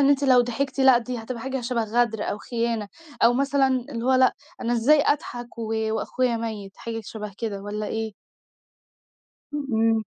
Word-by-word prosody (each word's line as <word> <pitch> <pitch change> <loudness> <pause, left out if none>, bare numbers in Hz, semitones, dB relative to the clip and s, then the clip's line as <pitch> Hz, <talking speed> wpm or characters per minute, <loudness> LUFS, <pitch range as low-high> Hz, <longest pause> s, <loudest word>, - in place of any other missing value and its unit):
إن 280 - +5
أنتِ 285 0 +3
لو 255 -2 +6
ضحكتِ 255 +3 -2
لأ، 260 -2 +7
دي 245 0 -4
هتبقى 230 +1 -6
حاجة 265 +1 -3
شَبَه 240 -1 -1
غَدر 225 -1 +1
أو 205 - -2
خيانة 230 -1 -2 0.3
أو 235 - +7
مثلًا 275 +1 +2
اللي 250 -2 -2
هو 260 - +3
لأ، 255 -1 +5 0.3
أنا 235 - -1
إزاي 275 +6 +5
أضحك 245 -5 -2
و 225 -1 -3 0.2
وأخويا 245 +1 0
مَيّت؟ 215 -4 -5
حاجة 230 -1 -5
شبه 210 -2 -7
كده 205 -4 -3
والّا 210 +1 -4
إيه؟ 220 -1 -3 1.4
إمم. 225 -6 +1
235 Hz, 170 wpm, -25 LUFS, 225-260 Hz, 1.4 s, لأ